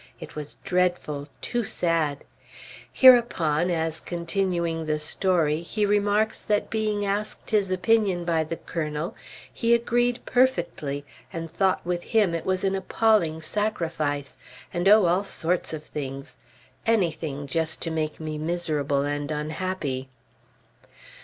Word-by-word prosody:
It - - -10
was 150 -1 -6
dreadful! 180 -6 0
Too 240 -1 -1
sad! 165 -7 0 0.7
Hereupon, 185 - +5
as 160 -2 0
continuing 170 -2 -2
the 155 0 +1
story, 160 0 +1
he 205 +5 -1
remarks 205 +1 +1
that 210 -2 0
being 215 -2 0
asked 205 +2 -3
his 205 -3 +2
opinion 185 -2 +2
by 165 -2 +2
the 165 - -4
Colonel, 155 0 -3 0.4
he 235 0 +3
agreed 240 +1 0
perfectly 175 - 0 0.3
and 165 -1 -5
thought 190 +1 +1
with 175 0 -1
him 210 -7 +2
it 165 - -3
was 185 -1 0
an 195 0 +1
appalling 190 -4 +2
sacrifice, 155 -8 -2 0.4
and 175 +3 +2
oh, 210 -2 +7
all 180 +3 +2
sorts 180 -2 -1
of 155 -1 -5
things! 135 -3 -7 0.5
Anything, 160 -9 0
just 160 +3 -1
to 165 - -2
make 155 -1 -2
me 155 -1 -4
miserable 155 -4 0
and 145 0 -2
unhappy! 150 -3 -3
170 Hz, 130 wpm, -25 LUFS, 155-200 Hz, 0.7 s, oh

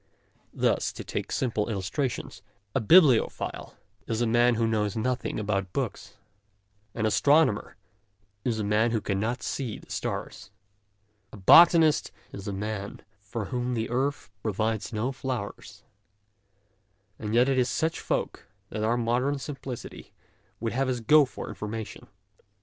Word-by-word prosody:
Thus, - - +1
to - - -7
take - - -4
simple 115 -4 -1
illustrations, 100 0 -3 0.3
a - - +2
bibliophile 135 - +3 0.3
is 115 - -1
a 120 - +2
man 120 +1 +3
who 115 0 +1
knows 105 -2 0
nothing 125 +1 -1
about 100 -3 -2
books; - - -4 0.8
an 110 - -1
astronomer 140 +1 +3 0.7
is 120 -3 0
a 110 - -2
man 105 +3 +2
who 115 -1 0
cannot 110 +5 -2
see 125 -6 -3
the - - -15
stars; - - -4 0.8
a - - -10
botanist 160 - +6 0.2
is 100 0 -8
a - - -2
man 100 0 -5 0.2
for 105 +1 -5
whom 125 0 -1
the 115 0 -2
earth 135 -1 -1
pro 110 -1 -2
vides 110 +1 -1
no 115 +4 -1
flowers; 130 -6 -6 1.4
and 105 +1 -3
yet 125 +2 +5
it 135 -1 +2
is 125 -1 +2
to - - -2
such 160 +1 0
folk - - -3 0.2
that 105 0 -3
our 115 +2 +2
modern 125 +4 0
simplicity 135 -3 -8 0.5
would 115 0 -2
have 135 +2 0
us 125 -1 -1
go 150 +6 +6
for 130 - -8
information. 110 +1 -6
115 Hz, 145 wpm, -27 LUFS, 105-130 Hz, 1.4 s, botanist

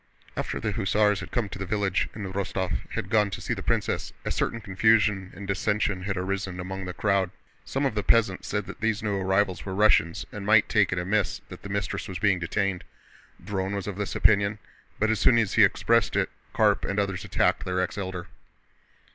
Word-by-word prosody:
After - - -3
the 110 - -1
hussars 105 -1 +2
had 100 - -7
come 120 -4 -1
to - - -7
the 95 - -3
village 100 -1 0
and 105 - -5
Rostóv 95 -3 -2 0.2
had - - -4
gone 105 -2 +4
to 95 - -5
see - - -2
the - - -5
princess, - - -1
a - - -1
certain 115 - -1
confusion 105 -2 +2
and 100 +2 -8
dissension 100 0 0
had 95 +1 -3
arisen 95 0 -3
among 95 +1 -5
the 90 - -5
crowd. 100 -3 +1 0.4
Some 135 +1 -1
of 135 - +1
the 105 - 0
peasants 105 -3 +2
said 105 -1 -2
that 100 - -10
these 110 -1 0
new 105 -2 0
arrivals 95 0 +1
were 95 -1 -5
Russians 100 -5 +3
and 105 - -6
might 105 +1 +5
take 105 -4 +3
it 90 - -1
amiss 95 +2 0
that - - -10
the 100 - -8
mistress 100 0 -2
was 95 - -5
being 100 -1 +2
detained. 95 +1 -1 0.6
Dron 95 -1 -2
was 100 - -3
of 100 -2 -5
this 105 -1 -3
opinion, 100 0 +3 0.4
but 110 +1 +2
as 110 - 0
soon 120 - +5
as 110 -4 +1
he - - +6
expressed - - +3
it - - +1 0.2
Karp - - +3
and 100 - -2
others 100 -2 -1
attacked - - +1
their 90 0 -1
ex 90 - -1
Elder. 95 -3 -4
100 Hz, 210 wpm, -26 LUFS, 95-105 Hz, 0.6 s, he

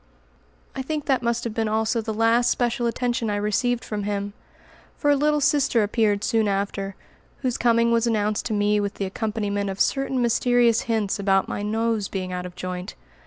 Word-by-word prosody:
I 265 - -2
think 300 +2 -3
that 265 -3 +1
must 235 0 -1
have 230 - -3
been 225 0 -1
also 220 +2 0
the 220 0 -4
last 230 +2 +3
special 240 0 0
attention 240 -1 -1
I 205 - 0
received 225 +4 0
from 210 -1 -3
him, 200 0 -3 0.6
for 290 - +2
a - - +5
little 300 +1 +2
sister 270 -5 +2
appeared 210 -1 +1
soon 225 -2 +2
after, 195 0 -2 0.5
whose 250 -2 0
coming 235 -1 +3
was 230 0 +2
announced 215 0 0
to 225 - -2
me 210 0 +2
with 200 -1 -2
the 200 - -3
accompaniment 205 0 -2
of 195 0 -5
certain 270 -1 +1
mysterious 240 -1 +3
hints 215 -3 0
about 195 -1 +2
my - - -4
nose 220 0 0
being 185 -1 -4
out 180 0 -4
of 180 - -13
joint. 180 0 -5
220 Hz, 190 wpm, -24 LUFS, 205-240 Hz, 0.6 s, a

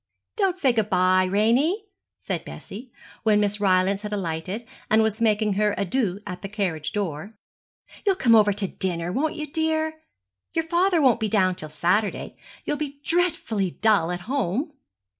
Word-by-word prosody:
'Don't 390 -4 +1
say 275 -8 +3
good 220 -3 0
bye, 185 0 +3
Ranie,' 245 - +2 0.4
said - - -3
Bessie, 235 +5 -10 0.3
when 215 -2 +3
Miss 205 0 0
Rylance 195 0 +2
had 210 0 -6
alighted, 185 +3 -3 0.2
and 220 +1 +4
was 220 +1 -1
making 215 -2 +2
her 210 +1 +1
adieux 200 -1 0
at 180 -3 -6
the 195 - -6
carriage 185 -7 -2
door; 200 0 -4 0.7
'you'll 395 -2 +3
come 240 -10 +3
over 210 -2 +6
to 200 -1 -1
dinner, 175 -2 -2
won't 300 - -1
you, 305 -2 -4
dear? 315 0 -1 0.5
Your 325 -1 +1
father 345 0 +2
won't 250 -3 +4
be 220 -2 -1
down 190 -3 +3
till 155 -3 -6
Saturday. 180 +7 0 0.3
You'll 295 - -1
be 285 -1 -5
dreadfully 295 - +1
dull 210 -6 +3
at 180 0 -3
home.' 260 - -2
210 Hz, 165 wpm, -24 LUFS, 190-280 Hz, 0.7 s, over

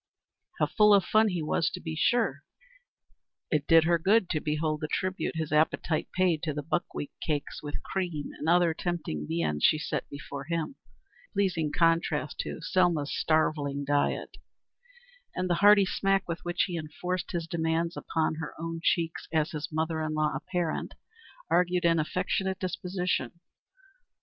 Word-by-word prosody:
How - - +3
full 210 -1 +5
of 195 - +3
fun 220 +1 +4
he 180 -5 -1
was, 155 - +1
to - - -6
be 160 -1 -5
sure! 180 - +1 1.1
It 150 -3 +1
did 165 -1 +7
her 170 +1 +3
good 195 +3 +3
to 155 - +1
behold 155 0 -1
the 155 - -2
tribute 185 +2 -2
his 160 -1 -3
appetite 155 +1 +1
paid 180 -4 +2
to 155 -3 -2
the 150 - -3
buckwheat 155 -2 -3
cakes 150 -3 -3
with 145 -1 -6
cream 175 -6 -3
and 155 - -1
other 175 -1 +4
tempting 160 - -3
viands 75 -3 -1
she 155 - +5
set 155 - -3
before 140 -1 -7
him 165 - -2 0.6
a - - -48
pleasing 175 -6 0
contrast 165 -3 +1
to - - -4
Selma's 165 -4 +1
starveling 145 -3 +1
diet 145 0 0 1.0
and 185 - -1
the 175 - +2
hearty 205 -1 +7
smack 195 +1 +1
with 170 -1 -4
which 175 0 0
he 175 -3 -3
enforced 180 +4 -4
his 170 -2 -2
demands 165 0 -1
upon 160 -1 -1
her 160 -2 -6
own 165 0 -4
cheeks 165 -2 0
as 155 -1 +1
his 150 -1 -5
mother 160 +1 -1
in 155 0 -2
law 155 -2 +1
apparent, 175 +3 -3 0.5
argued 180 0 +2
an 165 -1 +4
affectionate 185 +4 -1
disposition. 180 -5 -2
165 Hz, 160 wpm, -28 LUFS, 155-180 Hz, 1.1 s, did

